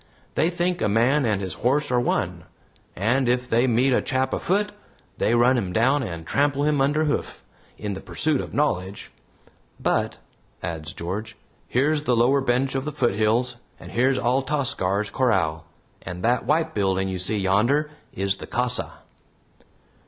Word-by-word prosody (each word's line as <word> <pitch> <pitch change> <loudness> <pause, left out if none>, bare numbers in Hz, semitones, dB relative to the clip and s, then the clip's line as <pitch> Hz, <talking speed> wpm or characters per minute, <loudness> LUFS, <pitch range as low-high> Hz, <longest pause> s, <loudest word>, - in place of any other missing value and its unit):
They 165 - +2
think 175 0 -1
a 105 - +2
man 120 +6 +3
and 105 -3 0
his 95 - -4
horse 145 +4 +1
are 125 - +3
one, 90 -8 -1 0.5
and 120 +6 +1
if 125 0 +1
they 120 +2 +2
meet 125 +3 +3
a - - +3
chap 130 0 0
afoot, 205 +3 0 0.5
they 120 - +2
run 125 +2 +4
him 95 -5 -3
down 130 +8 +3
and 85 -9 -5
trample 140 - +1
him 150 -2 +2
under 145 +3 +2
hoof, 150 - -2 0.3
in 105 -1 -4
the 95 - -7
pursuit 155 -3 -1
of - - -8
knowledge. 100 -10 -1 0.7
But," - - 0 0.5
adds 80 -2 -4
George, 105 +6 -5 0.3
"here's 145 +4 +1
the 125 - +3
lower 130 +4 +4
bench 130 +1 +1
of 135 -1 -1
the 150 - -2
foothills, 120 -2 +1 0.2
and - - -11
here's 130 +2 +2
Altascar's 120 -6 0
corral, 85 -11 +1 0.3
and 90 +1 -7
that 120 +1 +2
White 160 +2 +1
building 95 -2 0
you 95 -1 -3
see 100 +4 0
yonder 120 +11 +2 0.2
is 100 0 -1
the - - -9
casa." 125 +1 -2
120 Hz, 160 wpm, -24 LUFS, 100-140 Hz, 0.7 s, run